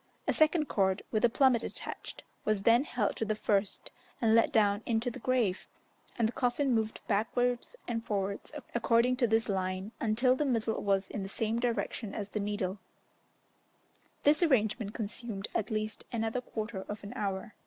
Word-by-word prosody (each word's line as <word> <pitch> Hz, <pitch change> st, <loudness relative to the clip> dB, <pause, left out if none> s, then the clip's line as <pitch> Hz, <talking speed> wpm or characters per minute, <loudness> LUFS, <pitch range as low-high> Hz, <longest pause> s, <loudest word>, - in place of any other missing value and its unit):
A -, -, +3 dB
second 310 Hz, 0 st, +3 dB
cord, 190 Hz, -7 st, +1 dB
with 215 Hz, -, +1 dB
a 240 Hz, -, +6 dB
plummet 255 Hz, -1 st, +4 dB
attached, -, -, -6 dB, 0.2 s
was 215 Hz, -2 st, 0 dB
then 235 Hz, +5 st, +5 dB
held 225 Hz, -8 st, -1 dB
to -, -, -1 dB
the 215 Hz, 0 st, 0 dB
first 205 Hz, -2 st, -1 dB, 0.3 s
and 225 Hz, -2 st, +3 dB
let 230 Hz, +5 st, +5 dB
down 205 Hz, -4 st, +3 dB
into 230 Hz, +1 st, +1 dB
the -, -, -8 dB
grave, 235 Hz, -7 st, 0 dB, 0.5 s
and 230 Hz, -, +3 dB
the -, -, -3 dB
coffin 250 Hz, +2 st, +1 dB
moved 220 Hz, -1 st, -1 dB
backwards 245 Hz, -, 0 dB
and 230 Hz, -1 st, -2 dB
forwards 200 Hz, -1 st, -2 dB, 0.2 s
according 235 Hz, +1 st, +3 dB
to 245 Hz, -2 st, +3 dB
this 225 Hz, +1 st, +2 dB
line, 190 Hz, 0 st, -2 dB
until 240 Hz, +4 st, +3 dB
the 300 Hz, -, 0 dB
middle 230 Hz, -5 st, 0 dB
was 195 Hz, -1 st, +1 dB
in 205 Hz, -, -5 dB
the 195 Hz, -, -5 dB
same 225 Hz, +3 st, -1 dB
direction 235 Hz, -3 st, -2 dB
as 205 Hz, -1 st, -4 dB
the 215 Hz, -, -3 dB
needle: 205 Hz, -1 st, -2 dB, 1.4 s
this 295 Hz, +2 st, +4 dB
arrangement 220 Hz, -, +2 dB
consumed 215 Hz, -1 st, -4 dB
at 215 Hz, -, -1 dB
least 215 Hz, -1 st, -2 dB
another 225 Hz, +1 st, -1 dB
quarter 215 Hz, -4 st, -5 dB
of 205 Hz, 0 st, -5 dB
an 200 Hz, -, -7 dB
hour. 200 Hz, +1 st, -3 dB
220 Hz, 175 wpm, -31 LUFS, 205-240 Hz, 1.4 s, a